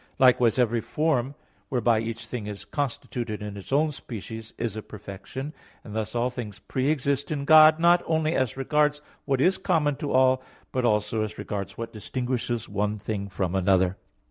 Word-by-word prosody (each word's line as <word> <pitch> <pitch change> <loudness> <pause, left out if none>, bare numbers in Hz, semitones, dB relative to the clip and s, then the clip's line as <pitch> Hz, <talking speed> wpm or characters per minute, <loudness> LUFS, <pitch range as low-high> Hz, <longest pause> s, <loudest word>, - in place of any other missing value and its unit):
Likewise 125 -3 +5
every 120 -2 +2
form 145 -3 0 0.3
whereby 120 -3 +2
each 115 +1 -4
thing 110 -1 -5
is 105 -1 -7
constituted 120 -6 -3
in 105 -1 -6
its 100 +4 -10
own 150 +3 +3
species, 110 -4 -8
is 115 -3 -2
a 110 - -4
perfection; 105 +8 -8 0.3
and 105 - -9
thus 110 +1 -3
all 120 +1 +1
things 110 -6 -6
pre 130 +2 -1
exist 140 -2 0
in 140 -2 -2
God, 155 +1 +8
not 175 +1 +5
only 160 0 +1
as 130 -4 0
regards 150 +2 +2 0.3
what 135 -2 +1
is 185 +7 +3
common 155 -6 +1
to 145 - -3
all, 130 0 +4 0.3
but 130 -1 0
also 105 0 +1
as 110 -1 -3
regards 100 -2 -5
what 115 0 -5
distinguishes 120 +1 -3
one 105 +1 -1
thing 100 -1 -4
from 95 -2 -2
another. 95 -1 +3
120 Hz, 175 wpm, -26 LUFS, 105-140 Hz, 0.3 s, God